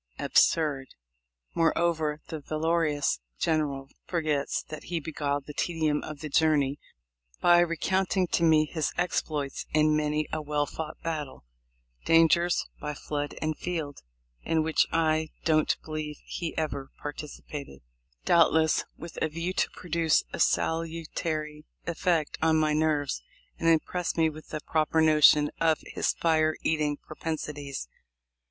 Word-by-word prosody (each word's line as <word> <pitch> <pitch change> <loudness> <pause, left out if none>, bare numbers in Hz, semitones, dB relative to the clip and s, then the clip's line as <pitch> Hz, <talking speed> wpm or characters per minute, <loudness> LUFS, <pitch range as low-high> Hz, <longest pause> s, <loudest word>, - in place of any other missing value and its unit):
Absurd! 145 -5 +2 0.6
Moreover, 165 -2 +1
the 160 - -4
valorous 155 - 0 0.2
General 145 - 0 0.2
forgets 155 -5 -1
that 155 -1 -9
he 175 -1 -2
beguiled 145 -2 -2
the 150 - -8
tedium 155 -2 0
of 155 -2 -8
the 155 - -4
journey 145 -2 +2 0.6
by 175 0 +6
recounting 185 +2 +1
to - - +1
me 160 -2 +5
his 155 -1 -2
exploits 150 -5 -2
in 155 0 +4
many 150 0 0
a 155 - -1
well 150 0 0
fought 155 +1 -6
battle, 150 - -4 0.3
— - - -37
dangers 165 +1 +4
by 150 0 -4
"flood 145 0 -4
and 155 0 -2
field," 160 -5 -4 0.4
in 160 -1 +1
which 160 0 +2
I 160 -1 +1 0.2
don't 155 -1 +3
believe 155 -1 -4
he 170 -2 -5
ever 140 -4 -2
participated, 145 - -7 0.2
— - - -40
doubtless 160 -1 +4
with 170 +1 -8
a 160 - +1
view 165 +4 -3
to - - +1
produce 165 -2 +1
a - - -4
salutary 160 -2 -1 0.2
effect 170 -2 0
on 160 0 +4
my 155 -1 +2
nerves, 150 - 0 0.4
and 165 - +2
impress 170 +2 +1
me 160 -1 +3
with 155 +1 -12
a 155 - -4
proper 155 +1 +1
notion 150 -1 +6
of 160 -1 +3
his - - -1
fire 155 -1 +2
eat 160 -1 +1
ing 145 -1 0
propensities. 150 - -5
155 Hz, 140 wpm, -28 LUFS, 150-165 Hz, 0.6 s, by